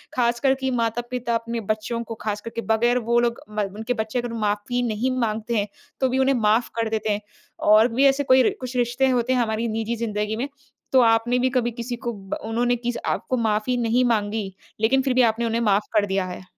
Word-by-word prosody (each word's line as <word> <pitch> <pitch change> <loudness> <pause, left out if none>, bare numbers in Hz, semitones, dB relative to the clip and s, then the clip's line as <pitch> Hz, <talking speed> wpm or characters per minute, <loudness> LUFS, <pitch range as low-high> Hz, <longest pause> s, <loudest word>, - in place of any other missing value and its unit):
ख़ासकर 240 +2 +2
कि 265 0 -2
माता-पिता 240 0 -1
अपने 230 0 -2
बच्चों 220 +2 -3
को 225 0 -7
ख़ासकर 210 +1 -3
के 230 - -2
बगैर 240 +2 +2
वो 235 - +4
लोग 235 -1 0
ब 210 0 -2
उनके 225 +3 -2
बच्चे 220 +1 -2
अगर 240 -1 -4
माफ़ी 210 +4 -1
नहीं 225 +4 -1
माँगते 225 0 -1
हैं। 205 0 0 0.3
तो 260 - +3
भी 260 - 0
उन्हें 265 +1 +3
माफ़ 225 0 +2
कर 230 -1 0
देते 220 0 -2
हैं 205 0 -1 0.5
और 215 +2 +7
भी 265 +4 +3
ऐसे 275 +1 +4
कोई 260 -1 +5
रि - - +3
कुछ 255 0 -6
रिश्ते 245 +2 +2
होते 250 0 +1
हैं 255 - +2
हमारी 225 0 -1
निजी 225 +1 -2
ज़िंदगी 215 -2 -2
में। 245 +5 -2 0.4
तो 260 - +6
आपने 230 +1 +3
भी 255 +1 +2
कभी 240 -1 0
किसी 235 +1 -5
को 235 - -1
ब 195 -2 -6
उन्होंने 240 +2 +1
किस 240 0 -3
आपको 255 - -1
माफ़ी 220 +2 0
नहीं 240 +1 +2
माँगी 210 -3 0 0.3
लेकिन 265 +4 +3
फ़िर 265 -1 0
भी 255 - +4
आपने 235 +2 -3
उन्हें 230 0 0
माफ़ 210 -2 +2
कर 210 -2 +3
दिया 195 -1 -1
है? 180 0 -7
235 Hz, 220 wpm, -23 LUFS, 220-245 Hz, 0.5 s, और